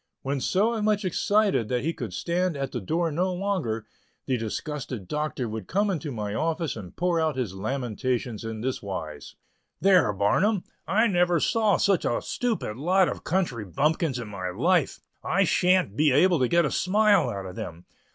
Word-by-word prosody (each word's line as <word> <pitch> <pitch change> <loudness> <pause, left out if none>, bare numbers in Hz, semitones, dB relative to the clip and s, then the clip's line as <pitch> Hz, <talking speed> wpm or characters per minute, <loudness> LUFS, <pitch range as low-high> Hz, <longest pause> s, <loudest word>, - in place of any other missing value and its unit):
When 135 0 -2
so 220 - +1
much 210 -1 +1
excited 200 - +2
that 125 -1 0
he 165 +3 0
could 120 - -6
stand 170 - -1
at 135 -1 -3
the 120 - -4
door 165 - 0
no 180 +5 0
longer, 180 - -2 0.4
the 130 - 0
disgusted 120 -1 -4
Doctor 150 -1 -2
would 110 -3 -6
come 200 +2 +1
into 160 -4 -3
my 105 -4 -4
office 160 +4 -1
and 100 -6 -9
pour 175 -1 +1
out 160 -3 0
his 120 -8 -2
lamentations 120 +2 -2
in 110 -1 -5
this 130 +2 -2
wise: 80 -8 -6 0.4
"There, 185 - +4
Barnum, 175 - +1 0.2
I 220 +4 +3
never 175 -5 +2
saw 215 0 +2
such 195 -4 +2
a 120 - 0
stupid 225 - -2
lot 180 +6 +3
of - - -6
country 160 - -1
bumpkins 145 - 0
in 120 -3 -5
my 95 -3 -4
life. 155 - +1 0.2
I 195 - +2
shan't 180 - +2
be 150 +2 +3
able 175 +5 +4
to 130 - +3
get 170 +4 +3
a 145 - -1
smile 205 +2 +3
out 100 -1 -5
of 90 -1 -8
them. 85 +1 -7
150 Hz, 180 wpm, -26 LUFS, 110-185 Hz, 0.4 s, There